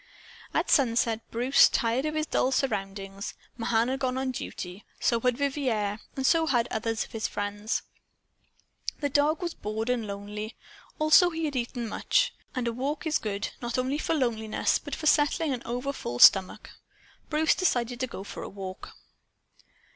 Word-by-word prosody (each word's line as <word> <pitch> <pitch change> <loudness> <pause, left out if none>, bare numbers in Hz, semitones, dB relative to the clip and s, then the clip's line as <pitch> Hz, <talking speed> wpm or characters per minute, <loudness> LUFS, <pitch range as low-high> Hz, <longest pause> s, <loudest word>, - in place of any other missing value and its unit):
At - - 0
sunset 230 -4 +3
Bruce 250 +4 +5
tired 235 +4 +1
of 305 - -3
his 310 0 0
dull 260 - +1
surroundings. 195 -5 -2 0.2
Mahan 230 0 +1
had 265 +1 -1
gone 255 -1 -1
on 265 0 -1
duty; 185 -5 -6 0.2
so 235 - +2
had 250 0 +1
Vivier; 250 -8 -1 0.2
so 325 +4 +3
had 240 -5 +2
others 225 0 -1
of - - -18
his 220 -1 -2
friends. 205 +3 -3 1.2
The 285 - 0
dog 295 +4 +2
was 340 -1 -2
bored 220 +3 -3
and 235 -3 -1
lonely. 205 +2 -6 0.4
Also 310 +4 +6
he 325 -1 -3
had 290 -2 -3
eaten 240 -1 -2
much. - - +1 0.2
And 250 -2 -1
a 235 - -1
walk 275 +7 -3
is 315 -1 +1
good, 205 -2 -3
not 240 0 -2
only 260 +3 0
for 325 - 0
loneliness, 225 -6 0
but - - -5
for 310 - -7
settling 300 0 +3
an 245 - -4
overfull 245 - -3
stomach. 190 +8 +6 0.6
Bruce 310 0 +3
decided 245 -9 0
to 255 - -1
go 195 - -7
for - - -8
a - - -6
walk. 190 -1 -8
245 Hz, 165 wpm, -28 LUFS, 215-280 Hz, 1.2 s, Also